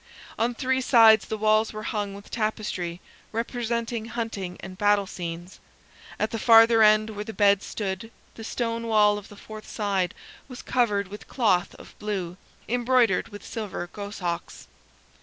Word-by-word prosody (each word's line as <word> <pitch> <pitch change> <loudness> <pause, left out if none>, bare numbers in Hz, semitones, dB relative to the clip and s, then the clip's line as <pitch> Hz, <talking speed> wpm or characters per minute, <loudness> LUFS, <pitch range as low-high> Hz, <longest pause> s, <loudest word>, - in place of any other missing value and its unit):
On 235 +1 +1
three 260 +2 0
sides 225 -3 +6
the 220 - -3
walls 215 +1 +2
were 215 0 -6
hung 205 -2 -3
with 200 +1 -13
tapestry 210 -6 -3 0.3
representing 235 0 -2
hunting 225 -6 -5
and 190 -1 -8
battle 205 +1 +3
scenes, 175 0 -7 0.6
at 215 - 0
the 225 - -3
farther 225 0 +6
end, 215 0 +5
where 210 -1 -5
the 220 - -7
bed 200 -2 +4
stood, 195 +1 -4 0.2
the 225 - -10
stone 230 0 -3
wall 210 -2 +4
of 205 - -15
the 205 - -12
fourth 215 +1 -10
side 195 -4 -1 0.3
was 250 -2 -10
covered 205 -6 +1
with 205 +1 -10
cloth 200 -8 +1
of - - -14
blue, 190 -4 -4 0.3
embroidered 245 -4 +2
with 205 -1 -11
silver 200 -5 -5
goshawks. 200 -4 -5
215 Hz, 155 wpm, -25 LUFS, 200-230 Hz, 0.6 s, sides